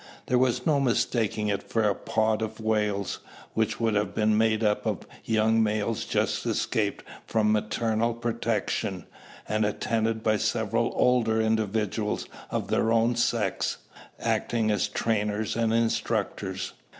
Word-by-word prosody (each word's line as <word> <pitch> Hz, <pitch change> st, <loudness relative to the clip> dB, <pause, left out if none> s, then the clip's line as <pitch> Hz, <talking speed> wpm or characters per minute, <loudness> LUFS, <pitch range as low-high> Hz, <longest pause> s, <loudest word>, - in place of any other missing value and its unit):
There 125 Hz, -, +2 dB
was 125 Hz, -1 st, +1 dB
no 150 Hz, -3 st, +3 dB
mistaking 115 Hz, -4 st, +1 dB
it 100 Hz, -1 st, 0 dB
for 115 Hz, +2 st, -1 dB
a 100 Hz, -, +3 dB
"pod" 110 Hz, +2 st, 0 dB
of 110 Hz, 0 st, -4 dB
whales, 105 Hz, -2 st, 0 dB, 0.3 s
which 110 Hz, 0 st, 0 dB
would 115 Hz, -2 st, +1 dB
have 105 Hz, -1 st, 0 dB
been 110 Hz, 0 st, +3 dB
made 110 Hz, 0 st, +2 dB
up 105 Hz, -1 st, +1 dB
of -, -, -2 dB, 0.2 s
young 110 Hz, 0 st, +3 dB
males 110 Hz, 0 st, 0 dB
just -, -, 0 dB
escaped 105 Hz, -2 st, -1 dB, 0.2 s
from 105 Hz, -1 st, +2 dB
maternal 110 Hz, +2 st, 0 dB
protection, 115 Hz, -5 st, -2 dB, 0.4 s
and 110 Hz, 0 st, +1 dB
attended 110 Hz, +1 st, 0 dB
by 110 Hz, -1 st, +3 dB
several 115 Hz, +1 st, 0 dB
older 115 Hz, -3 st, +3 dB
individuals 110 Hz, -1 st, 0 dB, 0.2 s
of -, -, -3 dB
their 110 Hz, -, +2 dB
own 115 Hz, +1 st, +3 dB
sex, 115 Hz, -4 st, 0 dB, 0.4 s
acting 110 Hz, -2 st, 0 dB
as 105 Hz, -3 st, +1 dB
trainers 105 Hz, -1 st, -1 dB
and 115 Hz, -1 st, +1 dB
instructors. 115 Hz, 0 st, -1 dB
110 Hz, 140 wpm, -27 LUFS, 105-115 Hz, 0.4 s, no